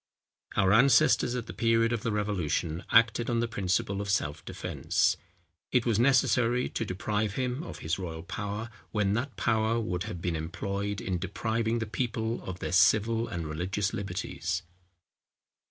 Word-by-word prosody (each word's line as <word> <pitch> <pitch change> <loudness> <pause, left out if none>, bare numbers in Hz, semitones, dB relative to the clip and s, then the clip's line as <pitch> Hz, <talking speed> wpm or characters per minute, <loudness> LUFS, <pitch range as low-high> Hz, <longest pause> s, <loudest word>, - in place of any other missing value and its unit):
Our 95 -1 +4
ancestors 125 +1 +5
at 120 -2 -3
the - - -8
period 115 0 +2
of 115 - -1
the 115 - -1
revolution, 90 -5 -1
acted 115 +1 +4
on 120 -1 +1
the 120 - +1
principle 100 -1 -1
of 100 - -5
self 75 -7 0
defence. - - 0 0.6
It 125 -2 +2
was 115 -3 +2
necessary 125 -1 +3
to - - -2
deprive 105 +1 -2
him 130 +1 -1
of 170 - -7
his 80 +4 0
royal 80 -3 -5
power, 105 +5 -4 0.2
when 105 -2 +1
that 120 +4 -2
power 110 0 +1
would 90 -5 -2
have 85 - -5
been 85 -1 -1
employed 100 +5 -3
in 90 -2 -2
depriving 110 +5 -1
the 115 - -2
people 115 0 -2
of 95 -1 -5
their - - -4
civil 110 +5 +4
and 85 -2 -4
religious 95 +6 -2
liberties. 90 -2 -3
105 Hz, 160 wpm, -29 LUFS, 95-115 Hz, 0.6 s, ancestors